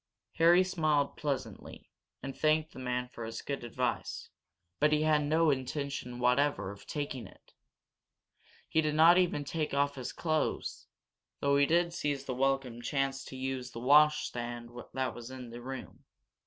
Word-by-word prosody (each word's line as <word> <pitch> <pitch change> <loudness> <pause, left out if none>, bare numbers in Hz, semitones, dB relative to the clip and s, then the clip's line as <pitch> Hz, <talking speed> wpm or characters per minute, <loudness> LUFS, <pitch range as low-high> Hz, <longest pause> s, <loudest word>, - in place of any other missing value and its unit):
Harry 170 +3 +6
smiled 155 -6 +1
pleasantly, 130 -8 -5 0.3
and 135 -1 -5
thanked 155 +2 +2
the - - -9
man 125 -1 -2
for 120 -2 -9
his 115 0 -6
good 140 -3 -4
advice. 120 - -3 0.5
But 150 +1 +4
he 155 0 +3
had 155 -1 +3
no 155 +2 +3
intention 135 -1 -3
whatever 125 -4 +2
of 100 0 -13
taking 140 -7 -4
it. - - -21 1.1
He 160 - +2
did 150 -1 -1
not 165 +3 +7
even 175 -5 +1
take 150 0 -2
off 140 0 +2
his 130 -2 -5
clothes, 155 +2 -2 0.5
though 140 0 +2
he 140 0 +4
did 170 +1 +2
seize 145 -4 -2
the 130 - -3
welcome 135 -2 0
chance 135 0 -1
to 130 - -8 0.2
us 125 0 -8
the 115 - -8
washstand 120 -4 +3 0.2
that 130 -2 -1
was 120 0 -9
in 130 -2 -8
the 120 +1 -8
room. 130 +1 -8
140 Hz, 160 wpm, -31 LUFS, 125-150 Hz, 1.1 s, not